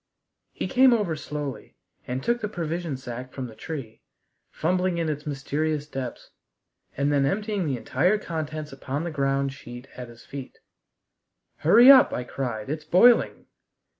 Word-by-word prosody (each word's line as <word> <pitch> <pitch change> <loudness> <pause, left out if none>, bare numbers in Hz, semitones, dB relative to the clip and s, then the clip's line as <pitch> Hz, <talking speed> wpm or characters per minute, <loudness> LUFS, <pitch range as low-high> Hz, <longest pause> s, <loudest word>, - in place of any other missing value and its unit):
He - - -4
came 260 -1 +5
over 205 -8 0
slowly 150 -3 -6 0.3
and 130 +1 -3
took 240 0 0
the 210 - -1
provision 170 -5 -3
sack 125 0 -7
from 130 - -5
the 115 - -9
tree, 115 -1 -7 0.5
fumbling 180 +2 0
in 165 -2 -1
its 150 0 -4
mysterious 150 +2 -2
depths, 135 -4 -7 0.7
and 140 +2 +1
then 140 -1 +3
emptying 200 +4 -1
the 135 -3 -1
entire 175 - +1
contents 155 -5 -5
upon 135 +2 -4
the 170 - -3
ground 135 -1 0
sheet 120 0 -11
at 125 -1 -8
his 115 0 -15
feet. 135 -2 -9 1.0
"Hurry 235 - +8
up!" 265 -2 +7
I 125 - -2
cried; 120 -4 -4
"it's 150 +2 -4
boiling." 210 +10 +4
150 Hz, 155 wpm, -25 LUFS, 135-175 Hz, 1.0 s, Hurry